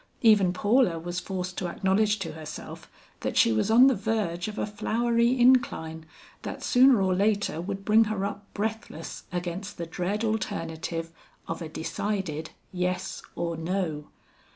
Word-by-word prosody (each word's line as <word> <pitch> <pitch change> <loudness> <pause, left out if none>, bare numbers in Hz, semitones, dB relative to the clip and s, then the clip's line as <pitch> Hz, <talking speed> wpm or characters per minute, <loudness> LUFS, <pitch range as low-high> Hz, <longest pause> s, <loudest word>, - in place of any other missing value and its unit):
Even 210 -5 +6
Paula 205 0 +2
was 175 +2 -4
forced 180 -1 -4
to 180 - -2
acknowledge 200 +4 +1
to 170 -5 -4
herself 155 0 -9 0.3
that - - -3
she 115 - +5
was 110 - +1
on 235 +4 +8
the 270 - +6
verge 200 -5 -1
of 215 0 -6
a - - 0
flowery 235 +3 +1
incline, 160 -11 +3 0.3
that - - -6
sooner 255 -3 +6
or 185 -1 +2
later 200 -3 +1
would 195 +2 -5
bring 220 +1 +5
her 210 -2 -2
up 200 0 -6
breathless 220 +2 -4
against 180 +3 -4
the 170 - -4
dread 180 +6 -2
alternative 165 -6 -3 0.4
of 165 - -4
a 160 - -5
decided 160 -1 -3 0.2
yes 180 0 -2
or 170 -1 -2
no. 165 -3 -2
190 Hz, 155 wpm, -27 LUFS, 170-215 Hz, 0.4 s, on